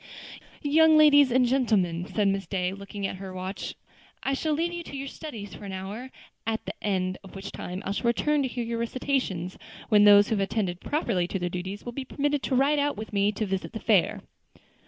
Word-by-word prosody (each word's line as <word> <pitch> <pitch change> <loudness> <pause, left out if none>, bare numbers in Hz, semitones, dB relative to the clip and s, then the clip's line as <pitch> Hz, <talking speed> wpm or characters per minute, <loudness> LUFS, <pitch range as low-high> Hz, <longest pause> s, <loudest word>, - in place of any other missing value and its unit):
"Young 315 +2 +5
ladies 290 -3 +7
and 255 +1 +4
gentlemen," 205 -9 +1
said 210 -2 +1
Miss 195 0 0
Day, 185 -1 -1
looking 200 0 -6
at 195 - -3
her 190 0 -7
watch, 185 +2 -5 0.5
"I 275 - 0
shall 305 +3 0
leave 335 +3 0
you 345 - -4
to 285 -4 -8
your 275 +1 -4
studies 230 -10 -8
for - - -10
an 195 -1 -6
hour; 200 +7 -6 0.4
at 225 0 -1
the - - -4
end 185 -2 -1
of 195 - -13
which 195 +1 -7
time 180 +2 -6
I - - -1
shall 205 +4 -1
return 295 +5 +2
to 270 - +1
hear 245 -1 -3
your 230 0 -3
recitations, 235 -7 -2 0.3
when 210 -2 +6
those 205 0 +8
who 220 - +2
have 195 - +1
attended 190 -3 -2
properly 225 - 0
to 195 - -2
their 180 -1 -2
duties 185 +3 -5
will 240 - -4
be 270 +3 -5
permitted 290 +2 -1
to 265 - -1
ride 285 +3 +3
out 285 -4 0
with 215 0 -7
me 200 +1 +3
to 215 - -2
visit 190 -1 -3
the 220 - -4
fair." 205 -8 +2
215 Hz, 220 wpm, -27 LUFS, 195-270 Hz, 0.5 s, those